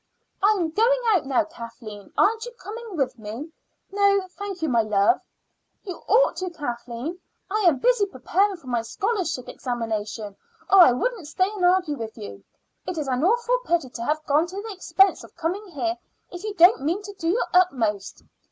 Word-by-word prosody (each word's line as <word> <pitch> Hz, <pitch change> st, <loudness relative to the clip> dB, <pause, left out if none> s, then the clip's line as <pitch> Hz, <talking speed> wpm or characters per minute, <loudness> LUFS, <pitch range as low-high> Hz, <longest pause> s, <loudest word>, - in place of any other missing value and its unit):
"I 410 Hz, +2 st, +5 dB
am 335 Hz, -4 st, -1 dB
going 475 Hz, +7 st, +3 dB
out 370 Hz, -10 st, +2 dB
now, 275 Hz, +4 st, +2 dB
Kathleen; 230 Hz, -, -10 dB
aren't 445 Hz, +2 st, +3 dB
you -, -, -7 dB
coming 450 Hz, -4 st, -8 dB
with 270 Hz, -4 st, -1 dB
me?" 225 Hz, +9 st, -7 dB, 0.4 s
"No, 400 Hz, -1 st, +3 dB
thank 390 Hz, -3 st, -6 dB
you, -, -, +2 dB
my 235 Hz, -5 st, +3 dB
love." 215 Hz, -, +2 dB, 0.6 s
"You 370 Hz, -4 st, -6 dB
ought -, -, +4 dB
to, 370 Hz, 0 st, -3 dB
Kathleen. 255 Hz, +1 st, -5 dB, 0.3 s
I 425 Hz, -, +1 dB
am 310 Hz, -6 st, +4 dB
busy 480 Hz, -4 st, +2 dB
preparing 385 Hz, +7 st, 0 dB
for 335 Hz, -, -21 dB
my 240 Hz, -2 st, -1 dB
scholarship 320 Hz, -, -2 dB
examination 220 Hz, -4 st, -4 dB, 0.4 s
or 390 Hz, -, +8 dB
I 345 Hz, -8 st, +9 dB
would 365 Hz, -, -2 dB
stay 370 Hz, +5 st, 0 dB
and 410 Hz, -4 st, -5 dB
argue 355 Hz, -4 st, +3 dB
with 225 Hz, -1 st, -7 dB
you. 210 Hz, -2 st, -9 dB, 0.4 s
It 365 Hz, -, -3 dB
is 300 Hz, -3 st, -2 dB
an 255 Hz, +1 st, 0 dB
awful 480 Hz, +6 st, +2 dB
pity 335 Hz, -, 0 dB
to 235 Hz, -, -6 dB
have 305 Hz, +4 st, -1 dB
gone 300 Hz, +4 st, +2 dB
to 365 Hz, -, -10 dB
the 440 Hz, -2 st, -6 dB
expense 385 Hz, +1 st, +2 dB
of -, -, -15 dB
coming 360 Hz, +5 st, -3 dB
here 340 Hz, 0 st, -2 dB, 0.4 s
if 355 Hz, +1 st, -8 dB
you 425 Hz, -1 st, -4 dB
don't 350 Hz, -4 st, +6 dB
mean 340 Hz, +8 st, -1 dB
to 405 Hz, 0 st, -8 dB
do 330 Hz, -4 st, -3 dB
your 430 Hz, +8 st, +1 dB
utmost." 235 Hz, -, +1 dB
340 Hz, 190 wpm, -24 LUFS, 250-400 Hz, 0.6 s, I